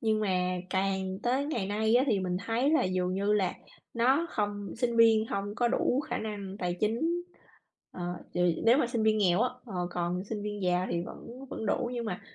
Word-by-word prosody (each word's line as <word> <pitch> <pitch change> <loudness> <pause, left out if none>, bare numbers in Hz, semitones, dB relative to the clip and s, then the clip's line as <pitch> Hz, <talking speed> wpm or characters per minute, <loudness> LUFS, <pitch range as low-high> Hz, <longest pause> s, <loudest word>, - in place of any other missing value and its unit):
Nhưng 220 -1 +1
mà 185 -3 0
càng 190 0 -1
tới 260 +4 +1
ngày 235 -10 -2
nay 220 +3 +1
á 255 - +4
thì 210 -7 +2
mình 180 -1 -1
thấy 240 +5 +2
là 315 - +3
dường 185 0 0
như 200 +2 +1
là 195 -4 +1 0.4
nó 260 +8 +3
không 205 -2 -2
sinh 235 0 0
viên 225 -1 +6
hông 200 -1 -3
có 240 +2 +2
đủ 255 +1 +1
khả 290 - -3
năng 205 -3 -5
tài 175 -2 -2
chính, 220 +2 +1 0.9
ờ, 180 - -8 0.3
ch - - -2 0.3
nếu 235 +4 +6
mà 250 - +2
sinh 235 -2 -1
viên 215 0 +3
nghèo 185 -2 +3
á, 250 - +1 0.2
ờ, 205 - -8 0.2
còn 175 +2 -2
sinh 210 0 -4
viên 205 -1 -4
giàu 180 0 +1
thì 170 - 0
vẫn 250 +8 -10
vẫn 220 - -4
đủ. 240 +4 0
Nhưng 240 -1 -3
mà 190 -5 -4
210 Hz, 215 wpm, -30 LUFS, 190-235 Hz, 0.9 s, viên